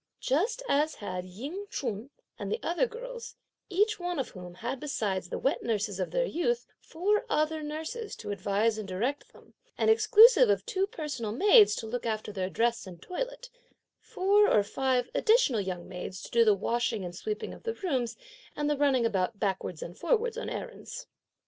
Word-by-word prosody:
Just 420 - 0
as 300 -1 +2
had 185 -3 -5
Ying 280 - -7
Ch'un 225 -2 -4 0.3
and 200 -1 -4
the - - 0
other 350 +9 +1
girls, 480 +1 -8 0.3
each 420 +3 +2
one 355 -1 -3
of 270 - -2
whom 180 -2 -10
had 240 +7 -4
besides 205 -11 -2
the - - -3
wet 270 - 0
nurses 205 -3 -1
of 185 - -1
their - - +1
youth, 475 +4 -1
four 400 +6 0
other 310 +1 +1
nurses 315 +9 -5
to - - -6
advise 205 +3 0
and 210 - -5
direct 235 +10 -2
them, - - -19 0.2
and 445 - +4
exclusive 455 +2 +7
of - - +2
two 385 0 0
personal 295 - -4
maids 415 - +6
to 225 - -5
look 235 +1 -3
after 215 -1 -2
their 190 -2 -2
dress 230 0 0
and 175 -2 -10
toilette, - - -5 0.5
four 405 +3 +3
or 210 - +4
five 255 +3 0
additional 435 - +3
young 185 -2 -5
maids 185 +1 -7
to - - -9
do 235 0 +5
the 215 -2 +5
washing 225 0 -1
and 175 0 -7
sweeping 430 - -4
of - - -12
the 455 -1 -3
rooms 265 - -2 0.4
and 295 0 -1
the 295 -1 +1
running 270 -4 +3
about 200 -2 0
backwards 190 -5 -2
and 175 - -9
forwards 475 -1 +1
on 480 - -4
errands. - - -7
265 Hz, 185 wpm, -29 LUFS, -, 0.5 s, exclusive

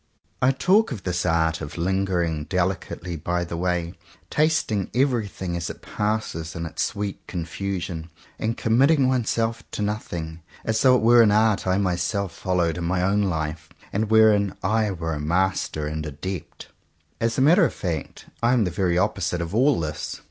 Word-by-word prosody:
I 125 - +5
talk 185 - +3
of 110 -7 -5
this 90 -1 -1
art 80 -1 +1
of 70 -1 -6
Hngering 85 -4 0
deHcately 90 -2 -2
by 85 0 0
the 85 - -5
way, 85 -1 -1 0.4
tasting 150 - +1
everything 110 -9 0
as 85 -1 -3
it - - -9
passes 105 -7 -2
in 85 0 -4
its 85 - -4
sweet 100 -1 -2
confusion, 90 -1 -4 0.3
and 115 +1 -1
committing 135 +5 +3
one 130 -3 +1
self 115 0 0
to 105 - -3
nothing, 85 -6 -4 0.2
as 110 -1 +1
though 130 -1 +6
it 125 - +1
were 120 +1 +7
an 110 - +6
art 110 -2 +2
I 95 0 +2
myself 95 0 0
followed 90 -1 -1
in - - -3
my 90 +1 0
own 100 +2 +2
life, 80 -4 -2 0.2
and 105 +2 0
wherein 110 -3 +4
I 110 +2 +2
were 80 -4 -3
a 75 - -3
master 85 -1 0
and 75 +1 -3
adept. 75 +4 -6 0.5
As 115 0 0
a - - +2
matter 170 +8 +6
of 150 - +3
fact 85 -6 -4 0.2
I 120 +1 +3
am 120 -3 +3
the 90 - -1
very 90 0 +1
opposite 90 -3 0
of 85 +1 -4
all 130 +3 +3
this. 75 -2 -4
95 Hz, 175 wpm, -24 LUFS, 85-110 Hz, 0.5 s, were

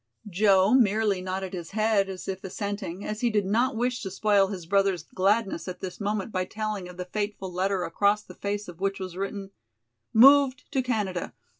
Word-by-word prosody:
] - - -16
Joe 195 0 +5
merely 215 -5 +3
nodded 185 0 -4
his 175 -3 -6
head 215 -3 +2
as 185 -1 -7
if 190 -1 -4
assenting, 200 -1 -5
as 210 0 -4
he 240 - +2
did 210 -3 +1
not 225 +5 +1
wish 245 +2 -1
to 190 - -4
spoil 200 0 +3
his 190 -4 -6
brother's 195 -2 +1
gladness 195 +2 0
at 185 - -6
this 185 -2 -7
moment 205 0 -2
by 185 -2 0
telling 215 -1 -4
of 180 - -12
the 180 - -4
fateful 205 -1 -4
letter 190 +1 0
across 205 +5 +1
the - - -12
face 205 +1 -4
of 175 -1 -10
which 195 0 -1
was 185 -2 -6
written: 195 +1 -5 0.6
"Moved 270 +2 +6
to 270 -2 +1
Canada. 210 -8 -2
200 Hz, 195 wpm, -26 LUFS, 185-215 Hz, 0.6 s, Moved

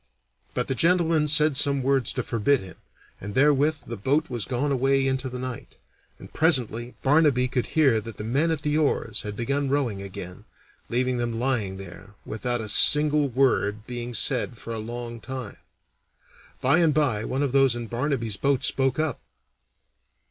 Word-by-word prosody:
But 125 - -1
the 135 - -1
gentleman 165 +1 +2
said 150 0 +4
some 140 -1 +2
words 135 -3 +1
to - - -2
forbid 120 +5 +1
him, 95 -1 -11 0.4
and 100 +1 -7
therewith 145 +2 +3
the 115 - -6
boat 140 +8 0
was 120 -4 -3
gone 135 +3 -1
away 135 +1 +2
into 130 0 -1
the 125 - -6
night, 125 -2 -7 0.4
and - - -14
presently 125 -7 +1
Barnaby 140 -3 +3
could 125 -1 -2
hear 135 -9 +3
that 110 -1 -9
the - - -6
men 135 +9 +1
at 160 -2 -2
the 150 +1 +1
oars 150 - 0
had 105 0 -6
begun 140 +5 -1
rowing 130 -8 -1
again, 90 -2 -9 0.4
leaving 125 +1 0
them 120 -1 -2
lying 115 -7 -1
there, 95 +2 -11
without 120 +2 -2
a 110 - -5
single 150 +6 +4
word 115 -5 +1
being 120 0 -6
said 125 -1 0
for 115 - -7
a 110 - -4
long 120 +1 -6
time. 130 +2 -7 1.0
By 140 +6 +3
and 160 -4 +3
by 130 -9 +1
one 135 +4 -2
of 140 - -1
those 135 -2 +3
in 120 -1 -5
Barnaby's 120 -3 -2
boat 140 -2 +1
spoke 135 -1 +1
up. 155 -2 -2
130 Hz, 175 wpm, -25 LUFS, 115-145 Hz, 1.0 s, said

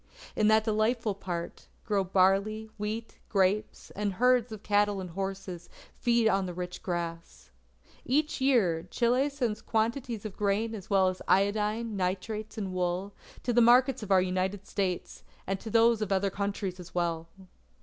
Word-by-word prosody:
In 215 - +3
that 220 0 +5
delightful 220 0 +1
part, 175 -3 -6 0.2
grow 205 -3 +1
barley, 195 +4 +2
wheat, 215 +2 -4
grapes; 200 +1 0
and 205 -1 -2
herds 250 +2 +3
of 215 -1 -8
cattle 205 -1 +2
and 180 -2 -6
horses 190 -1 -5 0.3
feed 235 -2 +2
on 195 -3 +2
the 180 - -6
rich 180 0 -5
grass. 165 - -5 0.5
Each 295 +2 0
year, 190 -11 +2
Chile 250 +6 +2
sends 245 -7 -2
quantities 230 0 -1
of 210 - -6
grain 210 +2 0
as 200 -4 -8
well 190 -2 +4
as 185 - -5
of - - -11
iodine, 210 +3 +1
nitrates, 205 +4 -3
and 195 -3 -3
wool, 180 +2 -2 0.3
to 245 - 0
the 240 - +5
markets 250 +2 +5
of 210 - -7
our 185 -1 +5
United 185 +2 -2
States, 185 -3 -3 0.2
and 195 0 -2
to 225 - -7
those 230 0 +4
of 210 -2 -2
other 195 0 +1
countries 200 -2 -3
as 180 0 -11
well. 165 -2 -1
205 Hz, 165 wpm, -29 LUFS, 185-225 Hz, 0.5 s, that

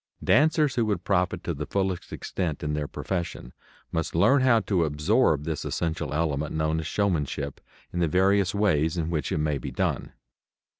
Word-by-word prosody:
Dancers 150 -1 +4
who 120 -2 +1
would 100 -5 -1
profit 90 -2 0
to 85 - -2
the 75 0 -5
fullest 95 -3 -2
extent 85 -4 -3
in 75 0 -1
their 75 -1 -2
profession 85 -10 -4 0.4
must 80 -1 -2
learn 115 +11 +5
how 130 -3 +5
to 95 -4 +1
absorb 75 - +2
this 80 -1 -3
essential 80 -3 -2
element 75 -1 -1
known 80 0 0
as 80 - -4
showmanship, 75 -8 -1 0.3
in 90 - -2
the 85 - +2
various 95 +3 +2
ways 80 -6 +2
in 85 0 -1
which 75 -5 -2
it - - 0
may 75 -2 0
be - - -5
done. - - -2
85 Hz, 180 wpm, -26 LUFS, 75-100 Hz, 0.4 s, learn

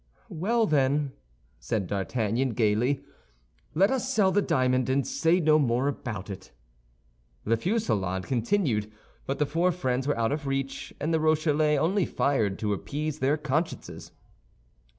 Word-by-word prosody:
"Well, 225 +8 +1
then," 140 -3 +1 0.5
said 95 - -2
D'Artagnan, 115 +6 -1
gaily, 120 +5 +1 0.7
"let 195 +7 +4
us 260 0 -1
sell 205 -7 +3
the 205 - +3
diamond, 130 -5 +1
and 135 0 +1
say 170 +2 +2
no 155 -2 +4
more 130 -1 +1
about 110 -8 -4
it." 95 -1 -9 0.9
The 115 - +2
fusillade 110 - -1
continued; 120 - 0 0.4
but 135 - -1
the 150 - +2
four 170 +5 +1
friends 130 -6 -1
were 145 - +1
out 115 +1 +1
of 145 -1 -3
reach, 135 0 -3
and 160 +3 -1
the 160 - +3
Rochellais 155 -1 +2
only 175 +6 +1
fired 110 -9 0
to 105 -1 -1
appease 150 +8 -4
their 140 +3 +2
consciences. 150 +3 -3
140 Hz, 145 wpm, -27 LUFS, 115-160 Hz, 0.9 s, let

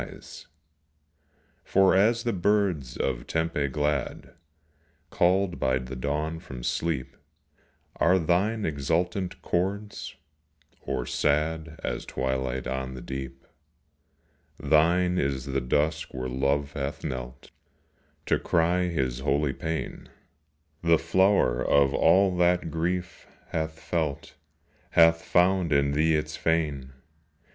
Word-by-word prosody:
25 - - -8
POESY. - - -12 1.2
For 95 0 +4
as 115 +4 +3
the 120 - 0
birds 95 -8 0
of - - -2
Tempe 80 -3 -1
glad, 75 +1 -2 0.8
Called 90 +1 +2
by 65 -1 +2
the 65 0 -6
dawn 75 +5 -2
from 65 -6 -9
sleep, 75 -1 -2 0.8
Are 90 +3 +4
thine 95 +6 +1
exultant 85 +5 -1
chords, 100 +4 -2 0.7
or - - -3
sad 80 +1 -1
As - - -3
twilight 65 0 -2
on 65 0 -4
the 65 - -8
deep. 65 0 -7 1.1
Thine 85 +4 +3
is 70 -2 -1
the 70 -1 -1
dusk 75 +5 -1
where 65 0 -3
Love 70 +3 0
hath 70 -1 -4
knelt 65 0 -6 0.7
To - - +1
cry 85 +2 +1
his 65 -8 -1
holy 70 -2 0
pain; 80 0 -5 0.7
The 85 -1 +4
flower 95 -5 +2
of 70 -1 +3
all 95 -1 +4
that 90 -2 +2
Grief 85 +2 -3 0.2
hath 80 0 -3
felt 80 -5 -3 0.6
Hath 80 0 +5
found 90 -1 +2
in 70 -1 +3
thee 80 +2 +2
its 75 0 -2
fane. 75 -5 -1
80 Hz, 115 wpm, -27 LUFS, 70-90 Hz, 1.2 s, Hath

